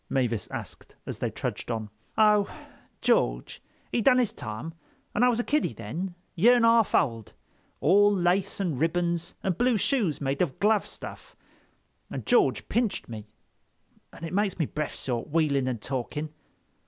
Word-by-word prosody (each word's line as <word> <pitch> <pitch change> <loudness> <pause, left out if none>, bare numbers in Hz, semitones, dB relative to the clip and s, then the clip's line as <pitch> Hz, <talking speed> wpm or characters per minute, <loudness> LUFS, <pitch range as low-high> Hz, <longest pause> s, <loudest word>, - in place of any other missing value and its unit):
Mavis 120 -5 0
asked - - -8
as - - -6
they - - -1
trudged - - -5
on. 110 -3 -3 0.3
"Oh, 210 -2 +5 0.5
George—he - - -1
done 250 +3 +5
his 245 -4 +1
time, 115 +8 -6 0.4
and 220 - +2
I 250 - +6
was 235 -1 +1
a - - +1
kiddy 295 - 0
then, 160 - -5 0.2
year 230 +8 +5
and 235 -1 +4
a - - +7
half 230 -2 +4
old, 115 -6 0 0.5
all 205 +6 +5
lace 185 0 +1
and 170 -10 -1
ribbons 170 +1 0
and 185 -3 -1
blue 245 -2 +3
shoes 210 - +1
made 140 0 -1
of 155 -8 0
glove 210 0 +2
stuff, - - -9 0.7
and - - -6
George - - +3
pinched 230 - -1
me, 110 -2 -7 0.8
and 165 - -8
it 165 - -6
makes 200 -1 +1
me 165 - +1
breff 150 +1 -4
short, 120 -3 -2
wheeling 145 -4 +1
and 120 -4 -3
talking." 145 +4 -4
170 Hz, 165 wpm, -27 LUFS, 130-210 Hz, 0.8 s, a